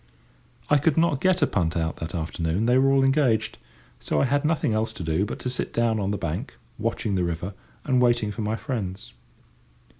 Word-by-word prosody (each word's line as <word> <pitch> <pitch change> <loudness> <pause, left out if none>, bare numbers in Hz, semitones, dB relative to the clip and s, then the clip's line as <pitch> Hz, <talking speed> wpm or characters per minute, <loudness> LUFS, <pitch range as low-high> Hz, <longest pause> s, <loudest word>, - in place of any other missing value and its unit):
I 150 - +5
could 150 +1 +1
not 165 -4 +2
get 185 -4 +3
a - - +7
punt 85 - -1
out 80 -1 -1
that 80 +3 -5
afternoon, 85 +4 -1
they 125 +1 +3
were 135 +1 +4
all 135 0 +4
engaged; 130 -6 +2 0.4
so - - -1
I - - +3
had 145 +2 +1
nothing 155 -7 +1
else 110 +1 0
to - - -6
do 80 +4 0
but - - -5
to - - -5
sit 125 - -2
down 115 -2 +1
on 100 -1 -1
the 105 - -1
bank, 85 -2 -4 0.2
watching 105 - -1
the 90 -2 +1
river, 85 +3 -3 0.3
and 130 -1 +2
waiting 120 -3 +2
for 110 - -5
my 105 +1 -1
friends. 100 - -5
110 Hz, 210 wpm, -25 LUFS, 90-135 Hz, 0.4 s, a